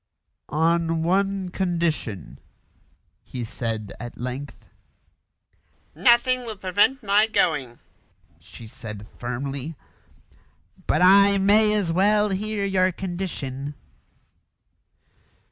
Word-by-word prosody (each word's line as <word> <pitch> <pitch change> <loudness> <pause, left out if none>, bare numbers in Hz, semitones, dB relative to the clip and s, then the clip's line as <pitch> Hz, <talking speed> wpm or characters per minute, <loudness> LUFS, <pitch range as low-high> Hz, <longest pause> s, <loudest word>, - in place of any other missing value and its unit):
"On 165 +1 +1
one 195 +1 0
condition," 160 - -2 0.8
he 125 -2 -7
said 110 -2 -4
at 120 0 -8
length. 125 +3 -6 1.3
"Nothing 255 +1 +4
will 230 -4 -7
prevent 205 +8 +1
my 210 +2 +4
going," 135 - 0 0.6
she 115 - -13
said 110 -2 -9
firmly; 135 +5 -4 1.1
"but - - +2
I 200 +2 +6
may 210 +2 +4
as 200 -6 0
well 210 +4 +3
hear 205 +1 -2
your 185 -1 +2
condition." 160 -7 -5
175 Hz, 90 wpm, -24 LUFS, 130-200 Hz, 1.3 s, I